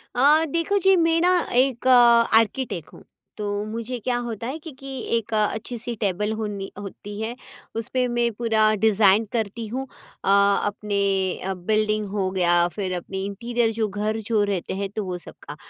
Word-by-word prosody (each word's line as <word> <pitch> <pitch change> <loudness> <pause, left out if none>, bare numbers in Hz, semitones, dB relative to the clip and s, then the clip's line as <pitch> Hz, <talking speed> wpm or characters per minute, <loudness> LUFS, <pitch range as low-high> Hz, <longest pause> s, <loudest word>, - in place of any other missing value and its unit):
अ, 300 +5 +5
देखो 335 +7 0
जी 385 +1 +5
मैं 330 -1 +3
ना 360 - +4 0.3
एक, 255 -1 +2
आर्किटेक्ट 235 - +4
हूँ, - - -14 0.3
तो 205 0 -2
मुझे 230 +3 -4
क्या 245 +2 -1
होता 230 0 -5
है 280 +4 -4
कि 320 0 -9
कि 275 - -10 0.3
एक 225 0 -5
अच्छी-सी 225 +2 -2
टेबल 210 +2 0
होनी 200 -2 -4
होती 205 +1 -8
है, 230 +2 -3 0.4
उसपे 250 +3 -1
मैं 240 -1 +1
पूरा 220 -1 +2
डिज़ाइन 210 0 +5
करती 225 0 -2
हूँ 265 +4 -4 0.4
अ, - - -5 0.4
अपने 205 0 -2 0.4
अ, 190 +1 -2
बिल्डिंग 215 +3 0
हो 195 -2 -1
गया 175 -2 +3
फिर 190 -3 -2
अपनी 190 +2 -5
इंटीरियर 230 +3 -1
जो 220 -1 0
घर 210 +2 -2
जो 215 -3 +2
रहते 185 -2 -2
हैं, 195 0 -3
तो 210 +1 -4
वो 180 -1 -3
सबका। 150 -3 -11
220 Hz, 170 wpm, -23 LUFS, 200-240 Hz, 0.4 s, अ